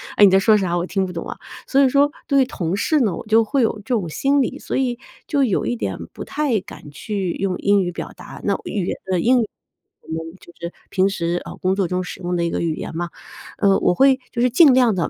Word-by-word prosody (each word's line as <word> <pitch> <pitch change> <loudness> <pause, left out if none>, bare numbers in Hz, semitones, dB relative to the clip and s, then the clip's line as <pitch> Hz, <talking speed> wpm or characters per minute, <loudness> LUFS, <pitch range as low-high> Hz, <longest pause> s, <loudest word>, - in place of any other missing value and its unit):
“哎， - - +5
你 200 - +8
在 190 - +6
说 215 +2 +5
啥？ 180 -3 0
我 175 - -1
听 195 +1 0
不 180 - -6
懂 165 -1 -6
啊”。 - - -5 0.3
所 275 - +3
以 265 - +4
说 280 +2 +4 0.2
对 275 -1 +4
于 - - +3
同 175 -8 -3
事 305 +8 +2
呢， 210 -7 +2
我 - - -8
就 225 +1 +5
会 270 +5 0
有 230 - +2
这 255 - -2
种 205 -7 0
心 275 - +2
理， 255 - -2
所 - - -4
以 250 -2 0 0.3
就 285 -3 +2
有 215 -8 +1
一 120 - -1
点 100 -4 -3 0.2
不 - - -7
太 280 -7 0
敢 155 -5 -12
去 195 +3 -3
用 190 -2 -2
英 200 0 +3
语 175 -1 -2
表 175 - -6
达， - - -11
那 200 - +1
语 200 -4 -2
言 - - -2
的 185 -2 0
英 245 +7 +4
语 220 - -2 0.5
我 160 0 -5
们 165 +2 -10
就 170 - -16
是 170 0 -5 0.2
平 190 0 +2
时， 175 -2 -2
啊， - - -7
工 185 +1 0
作 195 -2 0
中 180 +1 -1
使 180 - -8
用 180 0 -2
的 170 - 0
一 170 - 0
个 - - -2
语 165 -2 -1
言 - - -6
嘛。 175 +1 -3 0.5
呃， 200 -2 +4
我 - - +3
会 270 +5 +4
就 235 - -2
是 250 - +4
尽 275 +3 +6
量 245 -5 +4
地 175 - -1
195 Hz, 290 characters per minute, -21 LUFS, 175-250 Hz, 0.5 s, 你